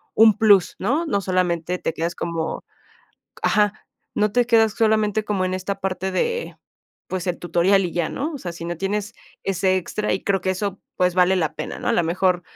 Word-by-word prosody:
un 220 -1 +6
plus, 205 -4 +4
¿no? 280 - 0
No, 200 - +1
solamente 180 -2 0
te - - -1
quedas 170 +1 -2
como, 165 -1 -3 0.8
ajá, 210 -1 +3 0.4
no 210 0 +2
te 245 +1 +3
quedas 225 -2 +4
solamente 215 -1 +2
como 200 -3 -1
en 185 - -2
esta 195 +1 -4
parte 190 0 -2
de, 470 - -2 0.5
pues 185 0 -4
el 175 - -1
tutorial 185 +3 +2
y 175 - -3
ya, 170 -2 0
¿no? 300 +5 -3
O - - -5
sea, 180 -8 -5
si 170 0 -8
no 170 0 -3
tienes 205 +4 -2 0.3
ese 190 0 +1
extra 210 +3 -2
y 185 - -2
creo 195 -1 +1
que 190 - 0
eso, 195 +1 -3 0.2
pues 180 -1 +2
vale 185 +1 +4
la 160 -4 0
pena, - - -5
¿no? - - -7
A - - +3
lo - - +3
mejor 180 +2 +1
190 Hz, 205 wpm, -22 LUFS, 180-210 Hz, 0.8 s, un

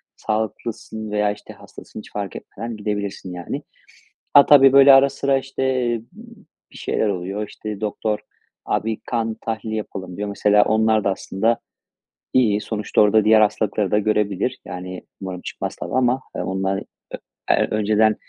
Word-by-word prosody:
Sağlıklısın 110 0 -4
veya, 105 0 +1
işte, 105 - -10
hastasın, - - -12
hiç - - -12
fark 100 -2 -5
etmeden 115 +2 -7
gidebilirsin, 100 -3 -4
yani. 90 -1 -5 0.7
Ha, 140 - +9
tabii, 135 -2 +7
böyle 140 0 +9
ara 135 +1 +7
sıra, 140 0 +1
işte, 135 0 -4 1.1
bir - - -13
şeyler - - -1
oluyor. 100 +2 -3
İşte, 105 0 -7
doktor, 105 0 -2 0.5
"Abi 110 0 -1
kan 115 -2 -1
tahlili 110 -1 -3
yapalım." 95 -4 -6
diyor. 105 0 -3
Mesela, 105 +1 +4
onlar 110 0 +2
da 100 - +2
aslında 110 +4 0 0.7
iyi, 110 -5 +3
sonuçta 105 -2 0
orada 105 0 +4
diğer 110 0 +6
hastalıkları 105 -1 +1
da 105 - +3
görebilir. 105 +2 0
Yani, 90 0 -7 0.2
umarım 95 -2 -5
çıkmaz, - - -5
tabii, - - -7
ama 130 0 +2
onlar, 95 +1 -1
ö - - -9 0.7
eee, - - +3
önceden, 110 0 +3
105 Hz, 150 wpm, -21 LUFS, 100-115 Hz, 1.1 s, Ha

